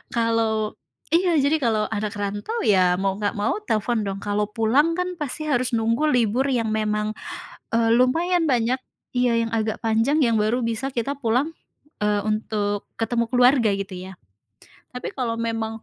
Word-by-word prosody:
Kalau 225 -2 0 0.4
iya, 350 +1 +3
jadi 290 +3 +3
kalau 220 -4 +1
anak 215 0 -2
rantau, 205 - -3
ya, 185 -4 +4
mau 195 0 0
enggak 205 -1 -1
mau 205 - 0
telepon 220 +1 0
dong. 195 0 -3
Kalau 205 0 0
pulang 245 +10 +2
kan 360 -1 -2
pasti 295 0 -4
harus 255 -4 0
nunggu 230 +5 +1
libur 245 0 +2
yang 240 -5 0
memang, 215 0 0 0.6
eee, 230 -1 +3
lumayan 330 +7 +2
banyak. 245 0 +2 0.4
Iya, 245 -1 +2
yang - - -5
agak 220 0 -1
panjang 230 +7 +2
yang 230 -4 +3
baru 225 +4 +1
bisa 230 +4 -2
kita 240 +4 -1
pulang, 250 +5 +1 0.5
eee, 210 -1 +2
untuk 210 -1 -1
ketemu 235 0 0
keluarga 245 -2 +4
gitu 195 -1 -5 0.2
ya. - - -9 0.8
Tapi 250 - -4
kalau 235 -3 -1
memang 225 -1 -3
230 Hz, 160 wpm, -23 LUFS, 215-255 Hz, 0.8 s, ya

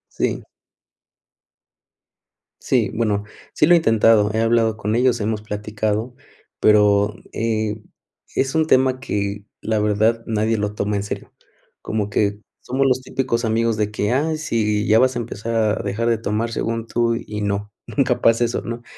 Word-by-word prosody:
Si. - - -1 2.2
Si, 115 -6 +1
bueno, 105 -3 0 0.3
si - - +3
lo 175 - +6
he - - +7
intentado, 115 -7 +4
he 110 - +1
hablado 115 -1 +2
con 105 0 -2
ellos, 125 -1 +2
hemos 105 0 -1
platicado, 105 +2 -3 0.5
pero, 105 0 +4 0.2
eh, 110 -1 -2 0.5
es 135 0 0
un 160 -1 +2
tema 130 -2 +3
que 100 -4 -3 0.2
la 110 0 0
verdad 110 +2 +1
nadie 110 0 0
lo 105 0 -2
toma 105 0 -1
en 100 - -2
serio. 100 - -6 0.5
Como 105 -2 -2
que 105 0 0 0.2
somos 135 +2 -1
los 130 -1 +2
típicos 130 -2 -2
amigos 115 0 +1
de 105 -1 -1
que: 105 0 -1
"Ay, 155 +5 +1
sí, 105 -7 0
ya 110 +2 +5
vas 130 0 +3
a - - -1
empezar 115 0 -4 0.2
a - - -2
dejar 105 +4 -1
de 115 - +2
tomar 110 +1 -2
según 115 0 -2
tú 115 0 0
y 105 -2 -6
no, 100 0 -2 0.2
nunca - - 0
pasa 115 +1 +4
eso" 120 +1 -1
¿no? 115 0 -6
110 Hz, 165 wpm, -21 LUFS, 105-115 Hz, 2.2 s, he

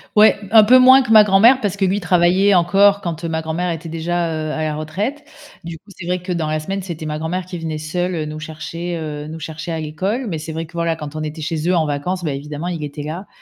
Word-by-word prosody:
Ouais, 210 -1 +6
un 220 -1 +8
peu 255 +4 +6
moins 260 +1 +8
que 230 - -4
ma 215 -1 +8
grand-mère 220 +7 +5
parce 205 -5 -2
que 200 - -2
lui 190 +2 +2
il - - -1
travaillait 180 +2 +3
encore 195 +3 +4
quand, 170 -1 -4
heu, - - -1
ma 160 0 -2
grand-mère 160 +3 -2
était 165 0 -6
déjà, 170 +1 -2
heu, 155 -1 -3
à 155 - -2
la 155 -1 -1
retraite, 200 - -4 0.4
du 165 -1 -6
coup, 200 +6 -24
c'est 180 -3 -10
vrai 180 0 -1
que 180 0 -5
dans 165 -3 -1
la 155 0 -1
semaine, 195 +4 -4
c'était 170 -4 -7
ma 150 0 -3
grand-mère 175 +3 -3
qui 180 -1 -7
venait 160 -1 -4
seule, 175 +4 -2
heu, 155 - -2
nous 155 0 -6
chercher, 165 +2 -6
heu, 150 -2 -5
nous 160 +1 -7
chercher 160 +2 -6
à 160 - -3
l'école 190 - -3
mais 160 - -3
c'est 155 +1 -7
vrai 165 0 -4
que, - - -20
voilà, 170 -1 -1
quand 150 -1 -8
on - - -3
était 155 +1 -6
chez 160 +1 -3
eux 180 - +3
en 160 -2 +2
vacances, 175 +6 -3
bah, 150 - -1
évidemment, 150 +4 -5
il 170 -3 -4
était 145 +1 -7
là 165 +6 -6
170 Hz, 275 wpm, -19 LUFS, 155-190 Hz, 0.4 s, un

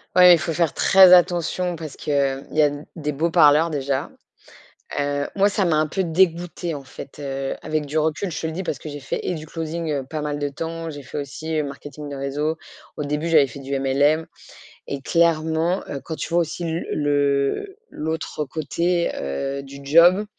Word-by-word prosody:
Ouais, 180 -1 +9
il 165 - +4
faut 160 +3 -2
faire 165 -2 +1
très 190 -1 +7
attention 175 0 +3
parce 155 -3 -8
qu'il 150 - -3 0.4
y 155 - +2
a 145 - +4
d 145 +1 -7
des 150 -2 -3
beaux 160 +4 0
parleurs 160 0 +5
déjà. 140 -3 -2 0.9
Heu, 145 0 -1
moi, 200 0 +4
ça 205 -1 0
m'a 165 - +2
un 155 0 +3
peu 190 +5 -2
dégoûtée, 170 0 0
en 140 -2 -6
fait, 135 +1 -11
heu, 135 -1 -3
avec 155 -1 -2
du 155 +2 -1
recul, 160 +4 -1
je - - -4
te 160 - -2
le 160 - -4
dis 190 +3 -4
parce 145 - -3
que 155 - -8
j'ai 145 0 -7
fait - - -4
et 180 - -1
du 155 0 -7
closing, 165 0 -4
heu, 140 -2 -1
pas 155 -1 -3
mal 145 -1 -3
de 145 0 -1
temps, 165 +3 -5
j'ai 145 -2 -8
fait 140 - -6
aussi, 155 +3 -4
heu, - - 0
marketing 145 +1 -8
de 140 - -6
réseau. 145 +4 -2 0.4
Au - - -2
début 150 +3 -2
j'avais 155 -4 +6
fait 135 +2 -10
du 135 0 -3
MLM 145 +4 +2 0.6
et 140 -1 -5
clairement, 165 +2 +1
heu, 140 - -4
quand 160 - -4
tu - - -5
vois 170 +1 +3
aussi 165 +2 -4
l 165 +1 -2
le 145 - 0
l'autre 160 -1 -4
côté, 170 +4 -1
heu, 135 - -3
du 140 0 -11
job. 175 +8 +5
155 Hz, 210 wpm, -22 LUFS, 145-170 Hz, 0.9 s, Ouais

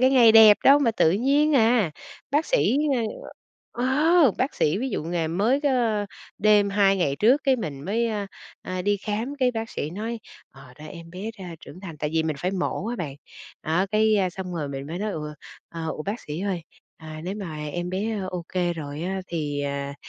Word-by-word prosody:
cái 260 +1 +5
ngày 240 -4 +6
đẹp 220 -2 +9
đâu 280 +1 +8
mà 270 -5 +2
tự 215 -7 +3
nhiên 280 +8 +2
à. 225 -6 +3 0.4
Bác 295 +4 +1
sĩ, 485 - +2 0.9
ơ 240 - -3 0.4
ờ, 265 -8 +5
bác 265 +3 0
sĩ 155 +5 +1
ví 260 +3 -2
dụ - - -3
ngày 165 -1 -1
mới 210 - +1
có 235 -7 +1 0.3
đêm 205 -1 +4
2 195 -1 +3
ngày 145 -7 0
trước 250 - +4
cái 270 -2 +4
mình 150 - -5
mới, 225 +6 0
a, 210 -2 -3 0.4
à, 185 0 -4
đi 205 +2 +1
khám 215 +7 -3
cái 255 -2 +3
bác 225 -1 -5
sĩ 150 - -4
nói: 225 +6 -4 0.3
"Ờ, 135 -2 -15
ra 150 +1 -10
em 165 +1 -10
bé 195 +5 -5
ra 180 -3 -7
trưởng 175 - -12
thành" 170 -5 -8
tại 150 0 -2
vì 160 - +3
mình 155 -2 -2
phải 180 +5 -1
mổ 190 +1 -2
á 240 - -3
bạn. 155 -9 -5 0.5
Đó, 170 +5 +1
cái 215 0 +3
xong 185 -1 -6
rồi 150 -4 -3
mình 135 0 -6
mới 165 +4 -5
nói: 210 +1 -2
"Ủa, 150 -2 -5 0.3
ờ, 165 -1 -5
ủa, 155 - -5
bác 205 +8 -4
sĩ 150 +3 -6
ơi? 190 -3 -2 0.3
À, 155 -1 -9
nếu 185 +2 -3
mà 180 -7 -6 0.2
em 175 0 -3
bé 210 +4 -2
ô 180 -2 -5
kê 175 -1 +1
rồi 150 -2 -6
á 190 +2 -2
thì, 150 -4 -3
à, 140 0 -3
195 Hz, 215 wpm, -25 LUFS, 160-225 Hz, 0.9 s, đẹp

